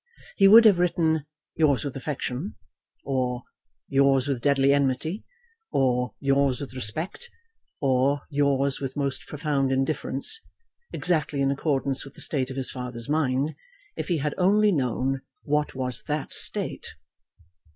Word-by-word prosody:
He 195 - +6
would 225 +3 +9
have 200 -5 +6
written 160 -4 +1 0.3
"yours 150 -4 +3
with 140 - -4
affection," 135 +4 -4 0.5
or 125 -2 -1 0.4
"yours 135 -1 +3
with 135 -4 -1
deadly 140 0 +3
enmity," 140 - 0 0.5
or 125 -2 +1
"yours 135 -1 +2
with 140 -3 -7
respect," 155 - -2 0.5
or 135 +1 +2
"yours 140 -1 +1
with 135 0 -5
most 140 -2 -2
profound 145 -3 -1
indifference," 135 - -1 0.5
exactly 155 -5 -1
in 135 0 +2
accordance 140 -1 -1
with 135 - -13
the - - -6
state 130 -4 0
of 135 - -7
his 130 - -3
father's 125 -1 -6
mind, 145 -1 +1 0.4
if - - -4
he 175 - +1
had 150 0 -1
only 205 +3 +4
known 135 - 0 0.2
what 150 0 0
was 125 -2 -2
that 150 -1 -3
state. - - -2
140 Hz, 140 wpm, -26 LUFS, 130-150 Hz, 0.5 s, would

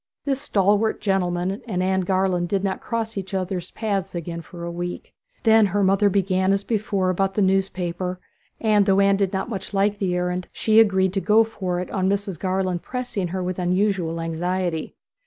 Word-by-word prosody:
This 275 -1 -1
stalwart 210 -3 +2
gentleman 190 0 0
and 185 -4 -1
Anne 190 0 +1
Garland 185 -1 0
did 195 -1 0
not 195 -1 -2
cross 225 -3 -3
each 195 +1 -6
other's 185 -2 -3
paths 200 -5 -3
again 170 0 -4
for 170 +1 -10
a 170 - -4
week. 175 +1 -5 0.3
Then 220 -2 +6
her 200 +2 0
mother 195 +2 +4
began 190 -1 +1
as 195 0 0
before 200 -4 0
about 195 +1 0
the 210 - +2
newspaper, 185 -1 -1 0.4
and, 210 -2 +3
though 195 0 +4
Anne 200 0 +4
did 195 -2 +1
not 190 +2 -2
much 200 -3 -6
like 200 +1 +1
the 185 -3 0
errand, 180 0 -2
she 220 0 +3
agreed 190 -4 +4
to 195 - 0
go 215 +2 +5
for 185 -5 -3
it 180 - -5
on 190 -1 0
Mrs. 195 -4 -2
Garland 185 -2 -1
pressing 245 -7 -3
her 185 +2 -3
with 185 0 -3
unusual 180 -2 0
anxiety. 165 0 -2
190 Hz, 190 wpm, -23 LUFS, 180-200 Hz, 0.4 s, Then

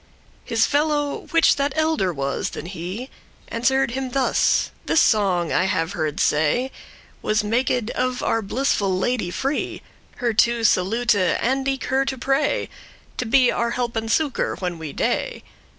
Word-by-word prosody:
His 225 -1 +2
fellow, 290 0 0
which 330 -3 +4
that 280 0 0
elder 315 - +1
was 140 -3 -2
than - - -7
he, 185 +8 -6 0.4
Answer'd 265 +2 +1
him 260 +1 -3
thus: 265 +1 +2 0.2
"This 320 - +4
song, 190 - +2
I - - +2
have 185 -3 0
heard 155 -4 -2
say, 160 - +1 0.5
Was 215 0 +1
maked 240 +1 0
of 255 0 -1
our 225 - +1
blissful 200 -4 0
Lady 210 -1 -1
free, 270 +10 -3 0.3
Her 240 -3 -1
to 235 +1 +2
salute, 225 +4 +3
and 235 +8 +1
eke 270 0 -1
her 265 +1 +1
to 265 - -3
pray 270 +3 0 0.5
To 250 - -2
be 250 +1 +4
our 235 0 0
help 240 0 -2
and 225 0 -2
succour 290 +2 0
when 180 -3 -4
we 155 -3 -6
dey. - - -2
235 Hz, 155 wpm, -22 LUFS, 190-265 Hz, 0.5 s, which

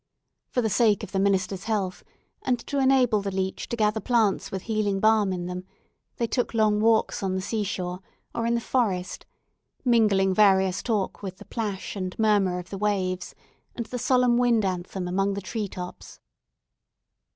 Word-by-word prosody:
For 250 - 0
the 220 - +1
sake 215 -3 +3
of - - -7
the 195 - 0
minister's 195 0 0
health, 200 -5 -2 0.4
and 250 -1 +1
to 280 - -1
enable 260 -5 +4
the 200 - -3
leech 190 0 -3
to - - -1
gather 215 -1 +1
plants 225 -5 +1
with 190 -1 -5
healing 210 -3 0
balm 215 -2 +3
in 180 -1 -3
them, 180 0 -5 0.5
they 235 - +1
took 235 +1 -1
long 215 -1 +3
walks 225 0 +2
on 190 -1 -1
the - - 0
sea 215 +2 -2
shore, 180 -2 -3 0.3
or 230 0 -1
in 235 - +2
the 235 - 0
forest; 200 -8 -1 0.6
mingling 210 -6 +4
various 190 -2 +4
walks 205 -4 -1
with 190 -2 -6
the - - -12
splash 210 -4 -4
and 185 -2 -4
murmur 205 -5 +2
of 180 0 -8
the 195 - -5
waves, 185 -4 -1 0.4
and 235 - -3
the 250 +3 -5
solemn 250 0 +3
wind 235 -4 +3
anthem 185 0 -3
among 195 +2 0
the - - -2
tree 210 +2 -3
tops. 180 -1 -9
205 Hz, 180 wpm, -26 LUFS, 190-225 Hz, 0.6 s, enable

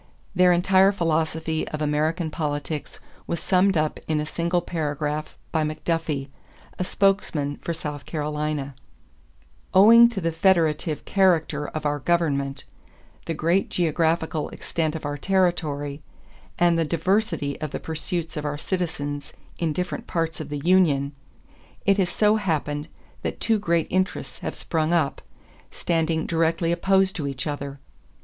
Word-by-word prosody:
Their 180 -1 +5
entire 190 +2 +5
philosophy 160 -3 -1
of 155 - -5
American 155 +2 0
politics 150 0 -3 0.3
was 170 - -2
summed 190 +1 +3
up 155 0 0
in 155 -1 +1
a 150 - -1
single 170 +3 0
paragraph 150 -2 -3
by 160 - +1
McDuffie, 155 -2 -2 0.5
a - - +1
spokesman 180 -8 +1
for - - -4
South 150 -3 -5
Carolina: 150 -2 -2 1.0
"Owing 230 +5 +9
to 230 -4 -4
the 165 -2 0
federative 160 -3 +2
character 160 -6 +2
of 155 -1 -5
our 145 0 0
government, 140 -4 0 0.6
the 165 - -1
great 170 +6 +1
geographical 160 -2 0
extent 160 -1 -2
of 155 - -5
our 145 0 -3
territory, 155 -6 0 0.6
and 170 -1 +3
the - - +3
diversity 170 -2 0
of 155 - -2
the - - -4
pursuits 160 +1 -3
of 150 - -3
our 145 -1 -2
citizens 145 -5 -3 0.3
in 165 -2 0
different 180 +4 -3
parts 165 -1 -2
of 155 -2 -6
the 145 - -3
union, 160 -6 +3 0.7
it 200 0 +4
has 185 -2 +2
so 210 +3 +3
happened 150 -6 -1 0.3
that - - -4
two 225 -2 +2
great 170 -5 +1
interests 185 +1 -1
have - - -4
sprung 160 0 -1
up, 160 -5 +1 0.5
standing 165 -1 0
directly 165 0 +1
opposed 190 +2 +2
to 145 -4 -2
each 135 -2 -4
other. 140 -2 -4
160 Hz, 140 wpm, -24 LUFS, 150-175 Hz, 1.0 s, Owing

